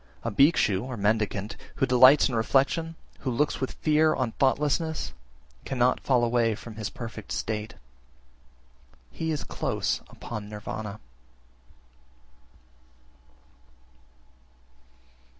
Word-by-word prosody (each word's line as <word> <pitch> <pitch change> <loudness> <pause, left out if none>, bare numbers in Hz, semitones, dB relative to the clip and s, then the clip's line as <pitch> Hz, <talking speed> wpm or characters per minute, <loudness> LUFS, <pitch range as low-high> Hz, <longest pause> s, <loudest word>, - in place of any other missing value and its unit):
32. - - -3
A - - -1
Bhikshu 125 - +3
(mendicant) 105 0 0 0.2
who 135 - +2
delights 130 +3 +7
in 130 - -5
reflection, 140 +8 +1 0.2
who 135 - -3
looks 145 +5 0
with 130 - -2
fear 155 0 +3
on 125 -3 -1
thoughtlessness, 145 - 0 0.5
cannot 125 -1 +1
fall 125 -3 +2
away 115 -2 +2
(from 115 +2 -10
his 110 -2 -3
perfect 115 -3 -8
state) 110 0 -3 1.4
he 160 - -3
is 155 -3 -2
close - - -2
upon 105 -3 -7
Nirvana. 105 0 -6
120 Hz, 100 wpm, -27 LUFS, 110-140 Hz, 1.4 s, delights